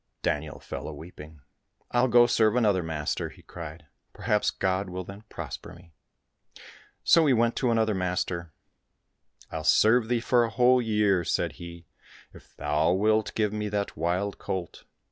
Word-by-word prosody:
Daniel 75 -1 -2
fell - - -7
a 80 - -6
weeping. 75 -1 -12 0.2
" - - -41
I'll 120 +1 +3
go 120 0 +6
serve 110 -2 +3
another 105 -6 +3
master," 80 -3 -3
he - - -17
cried, 80 -2 -9
" - - -49
perhaps 105 -2 +1
God 95 0 -1
will 90 +1 -5
then 100 +3 -10
prosper - - -7
me! 85 -1 -18 0.6
" - - -17 0.3
So 165 -2 +5
he 135 - +5
went 115 0 +2
to 125 - +1
another 110 -2 +2
master. 90 -2 -2 0.5
" - - -30
I'll 80 - -4
serve 110 +6 +4
thee 120 0 +1
for 120 +1 +3
a 115 - -1
whole 125 +1 +4
year," 105 -5 +2
said - - 0
he, 85 -1 -9 0.5
"if - - -17
thou 75 +4 +1
wilt 110 +3 +1
give 105 -2 0
me 105 0 -2
that 100 0 -2
wild 90 +5 -1
colt." 90 -3 -5
100 Hz, 175 wpm, -27 LUFS, 85-115 Hz, 0.6 s, go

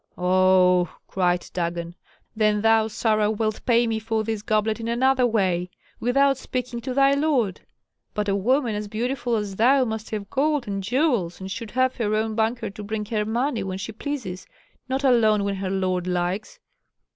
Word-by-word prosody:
"Oh!" 180 -1 +4 0.2
cried 180 -2 0
Dagon. 170 -1 -3 0.4
"Then 215 -1 +2
thou, 225 0 +4
Sarah, 215 -1 +1
wilt 215 0 -2
pay 240 -1 +4
me 225 -1 -1
for 220 0 -1
this 220 -1 -3
goblet 215 +1 0
in 230 - -5
another 255 +2 +3
way, 185 -6 0 0.3
without 275 +2 +2
speaking 250 -2 -4
to 255 +1 -4
thy 275 0 +5
lord. 280 - +1 0.5
But 210 0 -1
a 195 - +1
woman 240 +4 +1
as 210 0 -4
beautiful 240 +3 -2
as 205 -3 -3
thou 260 +4 +4
must 220 -1 -4
have 205 -2 -5
gold 290 -2 +1
and 195 -1 -3
jewels, 230 - 0
and 190 0 -7
should 225 +2 -5
have 255 +2 +1
her 215 -3 0
own 220 0 0
banker 225 +1 -1
to 210 +1 -9
bring 210 +1 -3
her 210 0 -1
money 235 +2 -1
when 190 -1 -4
she 200 +3 -5
pleases, 215 -7 -5 0.4
not 265 +2 -1
alone 220 -6 +4
when 200 -1 -2
her 190 0 -3
lord 185 -2 -1
likes." 180 - -2
220 Hz, 180 wpm, -24 LUFS, 195-245 Hz, 0.5 s, thy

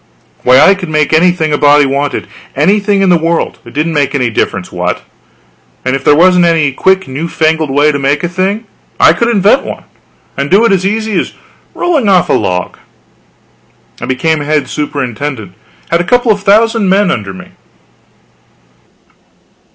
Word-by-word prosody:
Why, 125 +1 +4
I 195 - +6
could 185 -3 -7
make 155 -1 0
anything 160 -1 +2
a 145 - 0
body 145 0 +4
wanted 140 +1 -2 0.3
anything 200 +6 +1
in 190 - +2
the 175 -2 +3
world, 165 +1 -2
it - - -14
didn't 160 +2 -1
make 145 -2 0
any 125 -4 0
difference - - -3
what; - - -3 0.8
and 130 +1 0
if 135 - -5
there 145 - +4
wasn't 180 +2 +4
any 160 -4 +2
quick 190 +7 0
new 140 +6 -4
fangled 160 -2 0
way 145 +3 +2
to 145 - -3
make 140 +3 0
a - - 0
thing, 190 +5 -2 0.3
I - - +6
could 235 - -1
invent 210 +2 +3
one - - -7 0.5
and 140 +1 -3
do 205 +5 +4
it 230 - +2
as 190 -1 +1
easy 215 0 -1
as - - -4 0.4
rolling 305 - 0
off 185 -3 +3
a - - +2
log. 90 0 -2 1.2
I - - -5
became 155 +5 0
head 150 0 -1
superintendent; 135 - -4 0.4
had 170 +1 +2
a - - -2
couple 245 +3 +2
of 205 -1 -1
thousand 215 0 +2
men 195 0 +2
under 100 -4 -4
me. 95 - -11
160 Hz, 175 wpm, -11 LUFS, 145-195 Hz, 1.2 s, I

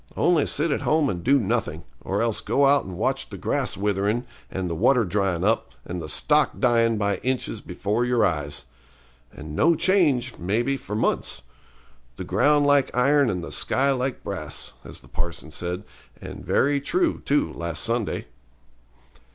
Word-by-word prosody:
Only 170 -5 +3
sit 155 +2 0
at - - 0
home 155 -2 +2
and 85 -2 -5
do 140 +3 +4
nothing, 115 -1 -1 0.2
or 100 +4 -1
else 115 -2 -1
go 140 - +2
out 140 +1 +4
and 90 -2 -7
watch - - -1
the - - -8
grass - - -1
witherin' 105 +4 0 0.2
and 95 -1 -3
the 85 - -2
water 120 +8 +3
dryin' 95 -2 0
up, 110 +3 +1
and 90 -1 -5
the 75 - -6
stock 150 - +2
dyin' 115 -3 +3
by 100 -1 0
inches 130 0 -2
before 105 +4 -2
your 120 -1 +2
eyes. 75 -4 -2 0.7
And 75 0 -9
no 165 - +4
change, 145 -10 +2
maybe, 115 +10 0
for 105 -5 -6
months. 85 - 0 0.7
The - - -6
ground 145 0 +3
like 145 -2 +4
iron 140 +1 +4
and 90 -4 -2
the - - -7
sky 140 +1 +1
like 130 -1 -2
brass, - - -5
as - - -10
the - - -18
parson 85 -2 -5
said, 90 +4 -4 0.4
and - - -9
very 140 0 +2
true, 345 - 0
too, 145 +1 +1
last 85 -2 -3
Sunday. 115 -2 -1
115 Hz, 170 wpm, -24 LUFS, 95-140 Hz, 0.7 s, do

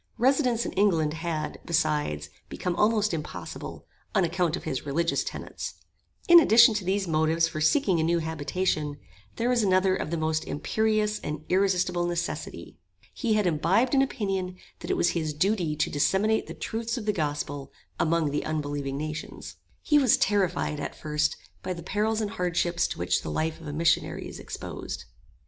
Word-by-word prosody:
Residence 250 -2 +2
in - - -3
England 165 -7 +2
had, 160 -2 -3
besides, 150 - 0 0.2
become 180 -1 -3
almost 210 -1 +2
impossible, 155 -2 -6 0.3
on 195 - +4
account 170 -1 +1
of - - -7
his 135 -5 -3
religious 165 +4 0
tenets. - - -6 0.5
In 345 0 +10
addition 235 -6 +7
to 210 -2 -2
these 190 +1 0
motives 160 +1 +2
for 155 - -5
seeking 185 - +3
a - - +2
new 170 +1 +2
habitation, 155 -1 -1 0.4
there 230 - -1
was 250 -1 +3
another 185 -1 +3
of - - -3
the 170 - -1
most 155 0 0
imperious 215 +6 0
and 150 +1 -5
irresistable 180 -2 +2
necessity. 175 0 -4 0.3
He 230 -5 0
had 210 -2 +2
imbibed 180 - +2
an 270 - +5
opinion 195 -8 -2 0.2
that - - -8
it - - +1
was 175 - +3
his 155 -3 -2
duty 175 -2 +1
to 150 - 0
disseminate 190 +10 +2
the - - -7
truths 230 +2 -3
of 225 - -5
the 210 - +1
gospel 145 -4 -3 0.3
among 165 -2 +2
the 145 - -1
unbelieving 145 -3 -3
nations. 155 +1 -6 0.3
He 295 -1 +4
was 260 -5 +5
terrified 190 -6 +1
at - - -5
first 155 0 -1 0.2
by 185 - -3
the 170 -1 -8
perils 215 +4 0
and 210 -2 -2
hardships 175 -1 0
to - - -6
which 85 +1 +1
the - - -6
life 160 - -2
of 160 - -9
a - - -4
missionary 165 +2 +1
is - - -9
exposed. - - -6
170 Hz, 175 wpm, -27 LUFS, 155-210 Hz, 0.5 s, In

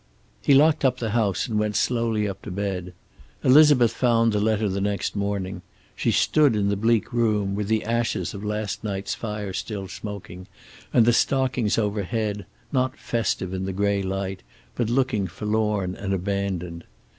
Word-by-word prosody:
He 140 - +4
locked 150 +2 +4
up 130 -2 +3
the 115 -3 -3
house, 105 -4 +1
and 110 -3 0
went 105 -1 -1
slowly 115 -3 +1
up 100 - -6
to - - -8
bed. 95 -2 -4 0.5
Elizabeth 135 -3 +6
found 115 -2 +2
the 105 - +1
letter 110 0 +1
the 100 0 -2
next 100 -2 -1
morning. 100 -2 -2 0.3
She - - 0
stood 145 -6 +3
in 100 -1 +1
the 100 - +1
bleak 115 +2 +1
room, 105 -4 +1
with 100 0 -2
the 110 0 +1
ashes 115 -5 -1
of 100 0 -7
last 105 -1 -3
night's 100 -2 -3
fire 105 -3 -5
still 100 -1 -4
smoking, 95 -3 -8 0.4
and 115 - +5
the 120 - +4
stockings 130 -3 +1
overhead 105 0 -1 0.2
not 130 0 0
festive 110 -5 -2
in 95 0 -3
the 95 - -3
gray 100 +1 +1
light, 95 0 -3 0.3
but 120 -2 -1
looking 120 -6 +1
forlorn 105 0 -1
and 100 -1 -2
abandoned. 90 -3 -3
105 Hz, 170 wpm, -24 LUFS, 100-115 Hz, 0.5 s, Elizabeth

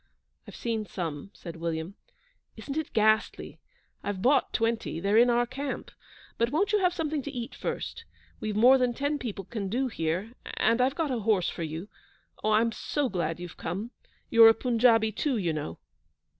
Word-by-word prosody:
'I've - - -10
seen 225 -3 -2
some,' 165 -2 -5
said 170 -4 -9
William. 165 +2 -3 0.6
'Isn't 275 - -6
it 315 -1 -3
ghastly? 215 0 +1 0.4
I've 200 -2 -4
bought 275 +3 +3
twenty; 225 -6 -1
they're 200 +4 +1
in 240 +2 +6
our 240 0 +3
camp; 270 +3 -5 0.5
but 235 +1 +2
won't 360 +10 +1
you 420 - +4
have 360 -2 +3
something 315 -4 -2
to 285 - -6
eat 245 -4 -5
first? - - -5 0.3
We've 215 -1 -3
more 250 +5 +6
than 245 -1 +1
ten 285 +2 -1
people 205 -7 -5
can 205 -3 -4
do 255 +5 0
here; 180 +3 -2 0.2
and 230 +2 +3
I've 265 +2 +2
got 315 -4 -1
a 245 - -1
horse 205 -4 +2
for - - -7
you. 160 +4 -4 0.6
Oh, 215 - +1
I'm 220 +2 +3
so 285 +4 -2
glad 170 -3 -2
you've 175 -1 -8
come! 200 +8 -4 0.4
You're 230 -1 +9
a 225 - +4
Punjabi 230 -2 +3
too, 260 +4 -1
you 175 -6 0
know.' 145 - -4
225 Hz, 185 wpm, -28 LUFS, 190-255 Hz, 0.6 s, You're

